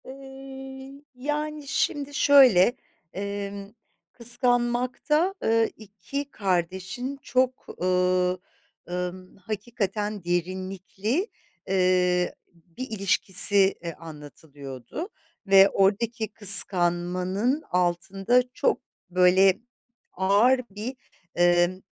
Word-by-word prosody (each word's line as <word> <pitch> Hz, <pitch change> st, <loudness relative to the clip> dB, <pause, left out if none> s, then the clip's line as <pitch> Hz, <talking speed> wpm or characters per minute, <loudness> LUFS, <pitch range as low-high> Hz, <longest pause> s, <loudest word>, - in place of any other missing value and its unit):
Iıı, 270 Hz, 0 st, -11 dB
yani, 295 Hz, +2 st, -4 dB
şimdi 285 Hz, 0 st, -2 dB
şöyle: 260 Hz, -8 st, +5 dB, 0.4 s
Emm, 200 Hz, 0 st, -6 dB, 0.4 s
Kıskanmak'ta, 245 Hz, -, 0 dB
ııı, 225 Hz, 0 st, +2 dB
2 245 Hz, +7 st, -7 dB
kardeşin 190 Hz, +7 st, -3 dB
çok, 255 Hz, 0 st, -1 dB, 0.2 s
ııı, 180 Hz, 0 st, +1 dB, 0.5 s
ımm, 180 Hz, +1 st, -6 dB
hakikaten 210 Hz, 0 st, -4 dB
derinlikli, 190 Hz, -, -3 dB, 0.4 s
eee, 180 Hz, -1 st, +1 dB, 0.4 s
bir 260 Hz, +1 st, -6 dB
ilişkisi, 195 Hz, -1 st, +4 dB
iii, 170 Hz, -1 st, -5 dB
anlatılıyordu 150 Hz, -, -10 dB, 0.4 s
ve 195 Hz, 0 st, +6 dB
oradaki 220 Hz, +4 st, 0 dB
kıskanmanın 185 Hz, -, +3 dB
altında 190 Hz, +6 st, +1 dB
çok, -, -, 0 dB, 0.3 s
böyle, 185 Hz, +1 st, +4 dB, 0.5 s
ağır 205 Hz, +8 st, +3 dB
bir, 215 Hz, +6 st, -7 dB, 0.4 s
emm, 175 Hz, +1 st, +2 dB
200 Hz, 75 wpm, -25 LUFS, 180-250 Hz, 0.5 s, ve